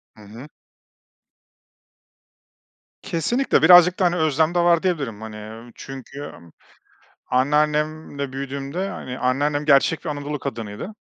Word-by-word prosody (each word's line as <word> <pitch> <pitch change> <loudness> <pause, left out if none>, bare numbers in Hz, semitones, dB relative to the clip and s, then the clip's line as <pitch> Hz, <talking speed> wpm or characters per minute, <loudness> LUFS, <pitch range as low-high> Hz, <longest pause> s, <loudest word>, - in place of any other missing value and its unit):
Hı 110 - -16
hı. 115 +7 -11 2.6
Kesinlikle, 200 +9 0
birazcık 180 0 +7
da, 185 - +3
hani, 175 0 +2
özlem 160 +1 +1
de 175 - +3
var 170 -1 +3
diyebilirim, 140 - -2
hani, 110 -1 -8
ööö, 110 +3 -10
çünkü 135 +1 -10
m 85 - -11 0.8
anneannemle 150 +1 0
büyüdüğümde, 140 +7 -4
hani, 130 -8 -7
anneannem 145 +4 0
gerçek 150 +3 +3
bir 160 - -3
Anadolu 145 0 -4
kadınıydı. 115 - -6
145 Hz, 120 wpm, -22 LUFS, 130-165 Hz, 2.6 s, birazcık